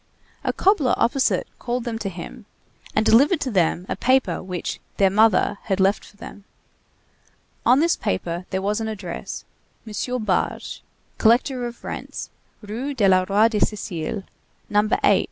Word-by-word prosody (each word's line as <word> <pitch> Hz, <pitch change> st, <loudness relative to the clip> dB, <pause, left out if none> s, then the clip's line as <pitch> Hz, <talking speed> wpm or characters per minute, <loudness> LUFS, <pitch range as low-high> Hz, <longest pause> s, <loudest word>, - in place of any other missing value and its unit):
A -, -, +1 dB
cobbler 355 Hz, -, +2 dB
opposite 260 Hz, +3 st, +2 dB
called 245 Hz, 0 st, -2 dB
them 230 Hz, -2 st, -4 dB
to 200 Hz, -, -3 dB
him, 195 Hz, +5 st, -9 dB, 0.5 s
and 215 Hz, -, +2 dB
delivered 280 Hz, +11 st, +5 dB
to 260 Hz, -, -1 dB
them 180 Hz, -2 st, +1 dB
a -, -, -2 dB
paper 255 Hz, -9 st, +2 dB
which 180 Hz, -2 st, -4 dB, 0.2 s
"their 195 Hz, -1 st, +4 dB
mother" 210 Hz, -1 st, +3 dB
had 190 Hz, 0 st, 0 dB
left 195 Hz, +2 st, +2 dB
for 205 Hz, -, -17 dB
them. 205 Hz, -, -10 dB, 1.2 s
On 260 Hz, +4 st, +6 dB
this 335 Hz, +1 st, +2 dB
paper 170 Hz, -, -3 dB
there 190 Hz, 0 st, -2 dB
was 210 Hz, +3 st, 0 dB
an 220 Hz, -, -2 dB
address: 190 Hz, -6 st, -6 dB, 0.4 s
M. 240 Hz, +2 st, -3 dB
Barge, 190 Hz, -4 st, -1 dB, 0.4 s
collector 245 Hz, +2 st, +3 dB
of 240 Hz, 0 st, -11 dB
rents, -, -, -6 dB, 0.3 s
Rue 245 Hz, +7 st, -4 dB
du 210 Hz, -6 st, +3 dB, 0.2 s
Roi 210 Hz, +3 st, +5 dB
de 220 Hz, -2 st, -1 dB
Sicile, 200 Hz, -2 st, -2 dB, 0.5 s
No. 210 Hz, +1 st, +3 dB
8. -, -, +5 dB
215 Hz, 155 wpm, -23 LUFS, 195-245 Hz, 1.2 s, On